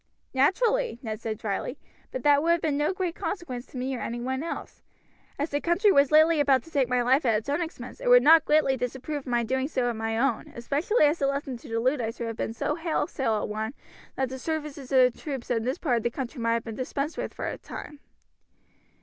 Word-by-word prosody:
"Naturally," 450 Hz, -, +2 dB
Ned 215 Hz, -2 st, -4 dB
said 220 Hz, -1 st, -3 dB
dryly; 225 Hz, +4 st, -3 dB, 0.3 s
"but 255 Hz, -, -5 dB
that 290 Hz, -1 st, +5 dB
would 335 Hz, +2 st, +3 dB
have 340 Hz, -, 0 dB
been 310 Hz, -2 st, 0 dB
of 300 Hz, -, +2 dB
no -, -, +1 dB
great 370 Hz, -3 st, -2 dB
consequence 330 Hz, -9 st, -5 dB
to -, -, -10 dB
me 260 Hz, +1 st, -2 dB
or -, -, -5 dB
any 235 Hz, +1 st, -4 dB
one 260 Hz, +2 st, -2 dB
else. 330 Hz, -, -6 dB, 0.6 s
As 290 Hz, +3 st, -2 dB
the 290 Hz, 0 st, 0 dB
country 360 Hz, +5 st, +3 dB
was 280 Hz, -4 st, +4 dB
lately 315 Hz, +1 st, +6 dB
about 270 Hz, -3 st, +3 dB
to 330 Hz, -, -16 dB
take 270 Hz, -5 st, +1 dB
my 250 Hz, -1 st, +2 dB
life 265 Hz, +5 st, +3 dB
at 230 Hz, -3 st, +3 dB
its 225 Hz, +6 st, -6 dB
own 290 Hz, +5 st, 0 dB
expense 320 Hz, -7 st, -7 dB
it -, -, -4 dB
would 245 Hz, 0 st, +7 dB
not 320 Hz, +2 st, +7 dB
greatly 300 Hz, -3 st, +3 dB
disapprove 265 Hz, +4 st, -3 dB
of 275 Hz, -, -15 dB
my 240 Hz, -1 st, +1 dB
doing 260 Hz, +3 st, 0 dB
so 255 Hz, -5 st, 0 dB
at -, -, -6 dB
my 225 Hz, 0 st, -2 dB
own, 245 Hz, -1 st, 0 dB
especially 290 Hz, -, +2 dB
as 295 Hz, +3 st, +2 dB
the 275 Hz, -, +2 dB
lesson 275 Hz, -1 st, -2 dB
to 260 Hz, -, -13 dB
the 225 Hz, 0 st, -1 dB
Luddites 245 Hz, -2 st, 0 dB
would 235 Hz, -, -3 dB
have 225 Hz, -, -5 dB
been 220 Hz, -, -3 dB
so 295 Hz, -, -1 dB
wholesale 310 Hz, -7 st, -1 dB
a 210 Hz, -, -1 dB
one 220 Hz, +4 st, -4 dB, 0.4 s
that 265 Hz, -1 st, -1 dB
the 260 Hz, 0 st, -6 dB
services 295 Hz, -3 st, -4 dB
of 255 Hz, -2 st, +5 dB
the -, -, -19 dB
troops 270 Hz, -6 st, -5 dB
in 230 Hz, -2 st, +1 dB
this 255 Hz, +6 st, -1 dB
part 255 Hz, -9 st, +1 dB
of -, -, -1 dB
the 235 Hz, -, +1 dB
country 250 Hz, +1 st, -5 dB
might 230 Hz, 0 st, +2 dB
have 230 Hz, 0 st, -1 dB
been 225 Hz, -, -6 dB
dispensed 275 Hz, +5 st, -3 dB
with -, -, -4 dB
for -, -, -5 dB
some -, -, -4 dB
time." 295 Hz, -1 st, -9 dB
265 Hz, 250 wpm, -27 LUFS, 240-305 Hz, 0.6 s, would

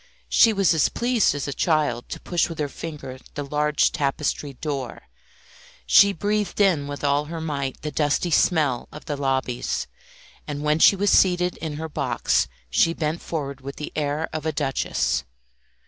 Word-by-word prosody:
She 230 Hz, -, +6 dB
was 195 Hz, -6 st, +3 dB
as 160 Hz, -3 st, +3 dB
pleased 240 Hz, -8 st, +1 dB
as 145 Hz, -, -3 dB
a 140 Hz, -, -3 dB
child 150 Hz, -8 st, 0 dB
to -, -, -5 dB
push 175 Hz, -1 st, 0 dB
with 165 Hz, -, -7 dB
her 150 Hz, -, -1 dB
finger 140 Hz, -3 st, -8 dB, 0.2 s
the 145 Hz, -, -3 dB
large 150 Hz, +1 st, +1 dB
tapestried 140 Hz, -2 st, -2 dB
door. 140 Hz, -5 st, -4 dB, 0.8 s
She 200 Hz, 0 st, +6 dB
breathed 205 Hz, +3 st, -2 dB
in 175 Hz, -8 st, +3 dB
with 145 Hz, 0 st, -6 dB
all 145 Hz, +1 st, +2 dB
her 165 Hz, +2 st, -6 dB
might 140 Hz, -4 st, -3 dB
the 150 Hz, -, -3 dB
dusty 150 Hz, +4 st, 0 dB
smell 150 Hz, -7 st, +2 dB
of 150 Hz, -, -11 dB
the 150 Hz, -3 st, -3 dB
lobbies, 135 Hz, -3 st, -1 dB, 0.6 s
and 145 Hz, -1 st, -4 dB
when 150 Hz, +1 st, +2 dB
she 200 Hz, -, +7 dB
was 200 Hz, +1 st, +1 dB
seated 180 Hz, -1 st, +3 dB
in 160 Hz, -2 st, -5 dB
her 160 Hz, +2 st, -5 dB
box 145 Hz, -, 0 dB, 0.2 s
she 165 Hz, -, +3 dB
bent 155 Hz, +1 st, -2 dB
forward 140 Hz, -4 st, -4 dB
with 140 Hz, +1 st, -7 dB
the 150 Hz, -, -6 dB
air 150 Hz, +1 st, -1 dB
of 155 Hz, -1 st, -3 dB
a -, -, +1 dB
duchess. 140 Hz, -2 st, -1 dB
150 Hz, 175 wpm, -24 LUFS, 140-165 Hz, 0.8 s, she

